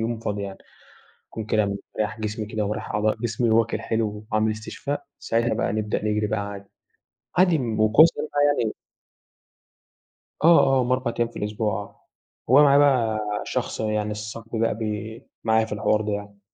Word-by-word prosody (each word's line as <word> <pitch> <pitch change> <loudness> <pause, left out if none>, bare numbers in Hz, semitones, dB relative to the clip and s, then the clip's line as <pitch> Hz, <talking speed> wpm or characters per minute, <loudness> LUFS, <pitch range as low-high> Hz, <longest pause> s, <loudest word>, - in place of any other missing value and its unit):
يوم 115 0 -2
فاضي 105 -2 -3
يعني. 100 -1 -6 0.7
يكون 110 - -6
كده 110 0 +2
مرتاح 105 +2 -4
جسمي 110 0 -3
كده، 105 -1 -2
مريّح 105 - -4
أعضاء 105 +1 +1
جسمي 115 +1 -1
وآكْل 115 +1 +2
حلو 105 -2 -2
وعامل 110 0 +2
استشفاء، 110 +6 -5 0.2
ساعتها 115 +1 0
بقى - - -1
نبدأ 105 0 -2
نجرِي 105 0 +1
بقى 110 +1 -1
عادي، 100 -1 -7 0.7
عادي 180 -3 +5
وكويس 115 +5 +5
إن - - -2
أنت - - -7 0.3
يعني 110 -2 0 1.7
آه، 170 0 +8
آه، 135 -1 +3
هم 125 +1 0
4 130 -2 0
أيام 120 - +2
في - - -10
الأسبوع 105 -1 -2
آه. 100 - -16 0.4
هو 140 +3 +8
معايا 140 -1 +6
بقى 125 -7 +3 0.3
شخص - - -3
يعني 105 -1 -1
صاحبي 110 +2 -6
بقى 115 -1 +2
بي 110 0 -5 0.2
معايا 110 0 +3
في - - -10
الحوار 105 0 +1
ده 105 -1 -2
يعني. 100 0 -6
110 Hz, 170 wpm, -24 LUFS, 105-115 Hz, 1.7 s, آه